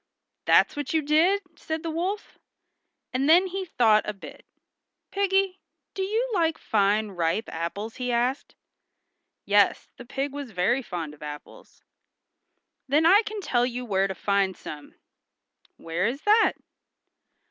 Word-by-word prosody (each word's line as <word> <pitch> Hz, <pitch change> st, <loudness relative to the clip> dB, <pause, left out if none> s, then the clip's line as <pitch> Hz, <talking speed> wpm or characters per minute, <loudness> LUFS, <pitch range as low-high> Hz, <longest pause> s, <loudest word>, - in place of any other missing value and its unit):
"That's -, -, +4 dB
what 290 Hz, +2 st, -3 dB
you 315 Hz, -, +2 dB
did!" 335 Hz, +7 st, +3 dB
said 315 Hz, 0 st, -5 dB
the 330 Hz, -, -3 dB
wolf. 370 Hz, +6 st, -4 dB, 0.7 s
And 270 Hz, +3 st, +1 dB
then 350 Hz, +4 st, +6 dB
he 380 Hz, +1 st, -4 dB
thought 220 Hz, -10 st, +3 dB
a -, -, -2 dB
bit. 195 Hz, -, -13 dB, 0.6 s
"Piggy, 390 Hz, -1 st, +1 dB, 0.3 s
do 385 Hz, -, -4 dB
you 440 Hz, +6 st, 0 dB
like 330 Hz, -4 st, +1 dB
fine 210 Hz, 0 st, +1 dB
ripe 175 Hz, +3 st, -1 dB
apples?" 200 Hz, +7 st, -5 dB
he 250 Hz, -1 st, -2 dB
asked. 245 Hz, +3 st, -1 dB, 0.9 s
Yes, 205 Hz, 0 st, +2 dB
the 245 Hz, -, -10 dB
pig 275 Hz, +2 st, -3 dB
was 285 Hz, -3 st, -6 dB
very 215 Hz, +6 st, +1 dB
fond 170 Hz, -, -6 dB
of 150 Hz, -, -18 dB
apples. 150 Hz, -1 st, -10 dB, 1.0 s
"Then 295 Hz, +4 st, +3 dB
I 390 Hz, +5 st, +7 dB
can 430 Hz, -1 st, -6 dB
tell 245 Hz, -9 st, +1 dB
you 250 Hz, 0 st, -5 dB
where 195 Hz, -3 st, +1 dB
to 190 Hz, -, -5 dB
find 195 Hz, 0 st, 0 dB
some." 150 Hz, -1 st, -10 dB, 0.8 s
"Where 170 Hz, +4 st, -2 dB
is 265 Hz, +5 st, -4 dB
that?" 435 Hz, +2 st, +4 dB
255 Hz, 145 wpm, -26 LUFS, -, 1.0 s, I